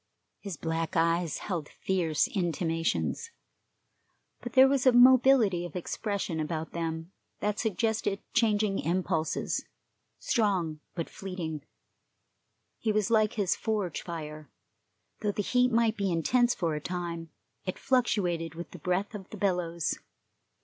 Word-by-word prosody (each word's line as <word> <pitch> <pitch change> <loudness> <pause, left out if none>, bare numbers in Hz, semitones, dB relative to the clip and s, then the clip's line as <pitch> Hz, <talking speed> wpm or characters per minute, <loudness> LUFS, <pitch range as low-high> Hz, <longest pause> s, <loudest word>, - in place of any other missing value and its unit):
His 195 -6 -6
black 165 +3 -2
eyes 165 0 +2
held 170 -7 -4
fierce 170 -5 0
intimations, 170 - -1 1.1
but 240 -1 -6
there 260 0 +8
was 270 -1 +2
mobility 250 -6 +6
of 175 -3 -7
expression 195 -1 -2
about 155 +1 -3
them 165 0 -4 0.3
that 210 0 -1
suggested 220 -2 0
changing 215 -3 +2
impulses, 170 -2 -1 0.5
strong 185 -9 0 0.2
but 165 -3 -2
fleeting. 175 -6 -5 1.2
He 220 - +1
was 215 0 +1
like 215 -2 +4
his 200 -4 +1
forge 205 -7 -2
fire; 155 -3 -7 0.7
though 210 -2 -1
the 205 - -1
heat 250 +3 +3
might 230 -1 +2
be 200 -2 0
intense 240 +9 +2
for 165 -3 -1
a 150 - -3
time, 170 -1 -4 0.4
it 185 - -3
fluctuated 180 - +1
with 170 +1 -7
the 180 - -10
breath 180 +7 -1
of 195 -3 -8
the 215 - -8
bellows. 175 -4 0
185 Hz, 130 wpm, -29 LUFS, 165-215 Hz, 1.2 s, there